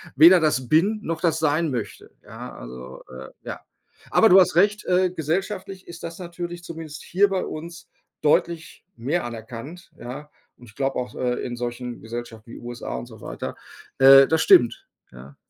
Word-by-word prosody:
weder 170 +6 +8
das 140 -6 0
bin 195 - +3
noch 165 -3 -4
das 165 -3 +1
sein 155 +1 +1
möchte, 115 -6 -5
ja, - - -9
also, 65 +2 -10
äh, 65 +1 -10
ja. - - -6 0.5
Aber 225 - +5
du 185 - +8
hast 180 -3 +3
recht, 205 +3 +3
äh, 180 0 +2
gesellschaftlich 190 +4 -4
ist 170 0 -10
das 165 - -6
natürlich 175 -1 -7
zumindest 160 -3 -8
hier 195 +4 +3
bei 190 -1 -1
uns 165 +2 -8 0.4
deutlich 160 +2 0
mehr 145 +9 -2
anerkannt. 120 +8 -9
Ja, 135 +5 -8 0.3
und 125 - -15
ich 105 - -20
glaube 135 +1 -1
auch, 125 - -4
äh, 125 -1 -1
in 120 -1 -4
solchen 120 0 -5
Gesellschaften 115 0 -8
wie - - -9
USA 120 0 -6
und - - -5
so 110 -3 -14
weiter. - - -6 0.4
Äh, 135 0 +9
das 160 0 +1
stimmt, 120 -6 +4 0.2
ja. 65 +3 -13
150 Hz, 175 wpm, -23 LUFS, 120-175 Hz, 0.5 s, Äh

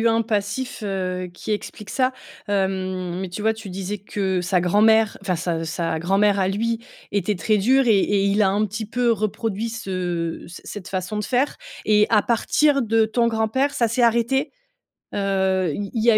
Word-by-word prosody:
eu 230 - +4
un 225 0 +3
passif, 225 +3 -2
heu, 185 -2 -2
qui 195 +4 -4
explique 210 0 -5
ça, 255 +3 +1 0.4
hem. 185 -2 -1
Mais, 190 -2 -4
tu 180 - -6
vois, 220 +1 +2
tu 220 -3 -9
disais 195 +2 -4
que 190 -2 -2
sa 180 0 +1
grand-mère, 215 +4 +4
enfin, 185 -3 0
sa 165 -1 -2
sa 165 0 -2
grand-mère 195 +4 +2
à 190 -1 +2
lui 230 +3 -1 0.3
était 205 +1 0
très 215 +4 +1
dure 255 +6 +3
et 215 -4 +5
et 200 0 +2
il 200 +2 +2
a 190 - +4
un 210 +2 +1
petit 215 +2 -5
peu 240 +2 0
reproduit 220 +1 -1
ce 180 -6 -3
cette 175 - -11
cette 185 - -11
façon 185 +2 -3
de 210 - -2
faire 260 +4 0 0.3
et 210 0 +5
à 215 -2 +5
partir 275 +4 +2
de 225 0 +3
ton 235 +2 +1
grand-père 230 +5 +1
ça 235 - +2
s'est 230 +3 0
arrêté? 235 +3 +2 0.6
Heu, 190 -3 +1
il 200 -1 -5
y 230 0 +3
a 215 - +6
205 Hz, 195 wpm, -22 LUFS, 190-225 Hz, 0.6 s, a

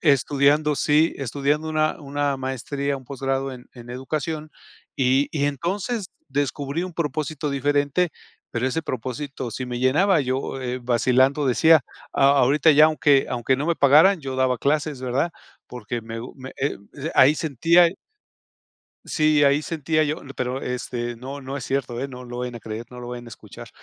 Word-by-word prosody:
estudiando 145 +1 +3
sí, 150 +4 +3
estudiando 140 +4 -1
una 155 0 0
una 145 -1 -1
maestría, 135 +2 -3
un 130 - -12
posgrado 135 0 -2
en 125 -1 -11
en 120 -1 -11
educación, 150 +4 -4 0.5
y 135 +2 +2
y 145 -3 -1
entonces 190 - -2 0.2
descubrí 140 +3 -2
un 185 - -7
propósito 155 -1 -3
diferente, 145 +4 +1 0.4
pero 120 +2 -1
ese 145 +5 -1
propósito 130 -1 -5
sí 130 - -4
me 125 -1 -4
llenaba. 155 +10 +3
Yo, 130 0 -2
eh, 125 0 -3
vacilando 130 +4 +2
decía, 160 +4 +5 0.3
a 135 - +3
ahorita 145 +5 +4
ya 150 +1 +7
aunque 145 -3 +3
aunque 125 +2 +1
no 140 - -2
me 170 - +1
pagaran, 155 +7 +6
yo 135 -2 -5
daba 130 -1 +1
clases, 145 0 0
¿verdad? 130 +6 0 0.4
Porque 120 -1 -5
me 115 0 -7
gu 120 - -9
me 130 0 -9
he 140 +2 -1 0.2
d 150 +3 -5
ahí 135 +3 +6
sentía 165 +4 +4
y 175 - -9 1.1
Sí, 155 -2 +3
ahí 140 +1 +4
sentía 155 0 0
yo 155 +2 -3
le 135 - -10
pero, 130 +1 -3
este, 120 -1 -4
no 135 +4 -7
no 135 +1 -6
es 125 - -6
cierto, 130 -3 -2
¿eh? 135 - -3
No 125 -2 -9
lo 120 0 -7
vayan 125 -1 -4
a - - -7
creer, 110 +1 -6
no 125 - -10
lo 120 0 -7
vayan 120 0 -7
a - - -10
escuchar. - - -12
140 Hz, 180 wpm, -23 LUFS, 125-150 Hz, 1.1 s, ya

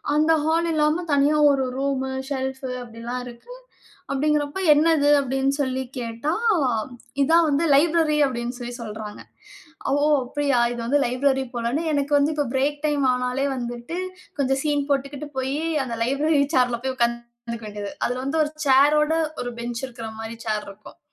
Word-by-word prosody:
அந்த 310 +2 +3
ஹால் 330 +2 +1
இல்லாம 310 +3 +2
தனியா 285 +2 +3
ஒரு 270 -1 +1
ரூமு, 270 -1 -1 0.2
ஷெல்ஃபு 265 0 -3 0.2
அப்டில்லாம் 235 +2 -6
இருக்கு. 240 - -11 0.6
அப்டிங்கிறப்போ 295 +4 0
"என்னது?" 300 -1 +3
அப்டின்னு 270 0 0
சொல்லி 260 -1 -1 0.2
கேட்டா? 235 +5 -3 0.9
"இதான் 325 +4 +5
வந்து 290 +3 +1
லைப்ரரி" 315 0 +3
அப்டின்னு 240 -1 -4
சொல்லி 245 0 -6
சொல்றாங்க. 215 -1 -7 0.7
ஓ! - - +3 0.3
அப்படியா 280 0 0 0.2
இது 240 - -6
வந்து 285 +5 +2
லைப்ரரி 265 +2 +1
போலன்னு 240 +6 -1
எனக்கு 285 -1 -1
வந்து 285 +2 +2
இப்போ 295 -1 0
பிரேக் 285 +2 0
டைம் 295 -2 +1
ஆனாலே 250 +2 -1
வந்துட்டு 240 +6 -5 0.4
கொஞ்சம் 270 -1 +1
சீன் 290 -2 0
போட்டுகிட்டு 280 +1 -2
போயி 265 +3 -1 0.2
அந்த 240 -3 -4
லைப்ரரி 285 +4 +2
சேர்ல 245 -2 +2
போய் 265 0 -1
உக்காந்துக்க 235 -1 -3
வேண்டியது. 205 -1 -6
அதுல 250 +1 -1
வந்து 275 +4 0
ஒரு 300 - -3
சேரோட 295 +3 +5 0.3
ஒரு 245 - -4
பெஞ்ச் 240 +1 -4
இருக்குற 235 -3 -8
மாரி 225 +1 -6
சேர் 215 -1 -1
இருக்கும். 200 +2 -14
270 Hz, 150 wpm, -23 LUFS, 240-290 Hz, 0.9 s, இதான்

